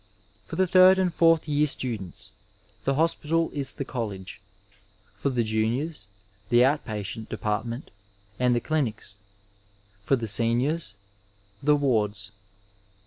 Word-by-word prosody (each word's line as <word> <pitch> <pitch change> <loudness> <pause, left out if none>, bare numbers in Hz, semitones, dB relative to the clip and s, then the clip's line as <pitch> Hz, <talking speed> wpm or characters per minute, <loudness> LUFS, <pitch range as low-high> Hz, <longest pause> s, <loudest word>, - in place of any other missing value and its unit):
For - - -6
the 190 - +3
third 185 +1 +7
and 185 -2 +1
fourth 165 -1 +4
year 150 0 +2
students, 115 - -4 0.5
the 135 - +2
hospital 165 +1 +1
is 140 -2 -2
tiie 140 - -5
college; 105 -8 -5 0.7
for 140 - -2
the 125 -3 +1
juniors, 110 +5 -1 0.4
the 120 +1 +6
out 145 +3 +1
patient 110 0 -5
depart 105 +1 -2
ment 120 +4 -6 0.5
and 125 -1 +3
the 120 - 0
clinics; 115 -10 -2 0.9
for 135 - +3
the 120 -3 -3
seniors, 120 +7 0 0.7
the 150 +1 +4
wards. 110 -7 0
125 Hz, 130 wpm, -26 LUFS, 110-150 Hz, 0.9 s, third